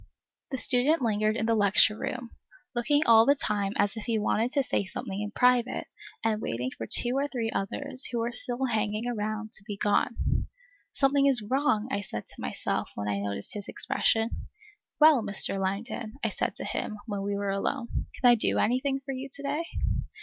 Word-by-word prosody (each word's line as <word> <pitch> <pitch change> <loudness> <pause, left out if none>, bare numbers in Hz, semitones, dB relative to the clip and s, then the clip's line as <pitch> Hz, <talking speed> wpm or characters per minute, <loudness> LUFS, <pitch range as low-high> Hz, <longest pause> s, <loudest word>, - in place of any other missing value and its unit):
The 265 - -3
student 260 +4 +2
lingered 215 -1 +1
in 220 - 0
the 230 - +2
lecture 210 0 +5
room, 245 +1 -5 0.4
looking 290 +5 +2
all 225 -1 +6
the 280 - +6
time 205 -6 -1
as 200 +1 +1
if 220 - -6
he 230 -2 0
wanted 220 +3 0
to 280 - +2
say 250 - 0
something 190 +1 -5
in 210 - -3
private, 250 +2 +2 0.4
and 220 -1 0
waiting 125 +3 -3
for 115 - -6
two 240 - +4
or 280 +1 +1
three 235 -5 -3
others, 260 +7 0
who 240 - -4
were 230 +1 -1
still 245 +2 -1
hanging 215 -2 -1
about, 215 -1 -3
to 205 - -6
be 205 -2 -5
gone. 205 +3 0 0.4
Something 275 0 +3
is 255 -6 +3
wrong! 250 -4 +1
I 200 - -1
said 105 - -6
to - - -10
myself, - - -2
when 105 - -4
I 100 -1 -1
noticed 100 0 -4
his 205 -1 -6
expression. 230 -4 +1 0.7
Well, 305 -4 +7
Mr. 205 -2 +2
Langdon, 215 +4 -3
I - - +2
said - - -2
to - - -6
him, 215 - -3
when 205 -3 -4
we 200 0 -2
were 200 0 -2
alone, 235 +5 -2 0.3
can 250 - +4
I 240 - +8
do 230 - +2
anything 265 +3 +1
for 270 - -4
you 265 +1 -6
to 280 0 -7
day? 290 +4 -2
225 Hz, 195 wpm, -28 LUFS, 205-255 Hz, 0.7 s, I